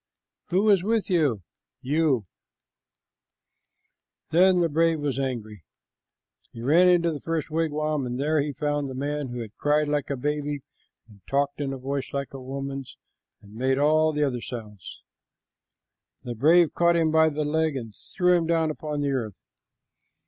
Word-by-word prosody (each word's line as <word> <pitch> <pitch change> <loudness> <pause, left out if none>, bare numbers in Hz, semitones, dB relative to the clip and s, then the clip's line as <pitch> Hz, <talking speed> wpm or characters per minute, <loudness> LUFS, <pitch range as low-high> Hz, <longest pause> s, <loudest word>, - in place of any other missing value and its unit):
"Who 190 +5 +1
is 195 -3 +4
with 220 -1 0
you?" 145 - +1 0.4
"You." 140 -4 +1 2.1
Then 185 +3 +5
the 180 - +2
young 165 -3 -1
brave 165 0 +2
was 140 -3 -2
angry. 110 -8 -4 0.9
He 115 - -9
ran 170 +8 +5
into 170 -1 +3
the 150 - -6
first 165 -2 -3
wigwam, 155 -3 -1
and 125 +1 -4
there 150 +1 +1
he 145 +1 -2
found 145 0 -2
the 130 - -7
man 145 +1 -3
who 120 -1 -5
had 110 -2 -9
cried 150 +1 +2
like 145 -1 -1
a 140 - -2
baby 145 +1 -2 0.4
and 105 -3 -19
talked 140 +1 0
in 140 -1 -2
a 135 - -4
voice 135 +1 -4
like 140 -1 -4
a 135 - -7
woman's 135 0 -6 0.5
and 100 0 -15
made 130 +4 0
all 155 +2 +3
the 150 -1 0
other 125 -4 -1
sounds. 105 -8 -9 1.2
The 120 -2 -5
brave 160 +8 +4
caught 170 0 +3
him 165 -2 +2
by 160 0 +5
the 150 0 -2
leg 160 0 0
and 115 -5 -6
threw 180 - 0
him 170 -2 +2
down 165 -2 +1
upon 150 -1 -4
the 140 -1 0
earth. 115 -7 -3
145 Hz, 170 wpm, -25 LUFS, 130-160 Hz, 2.1 s, Then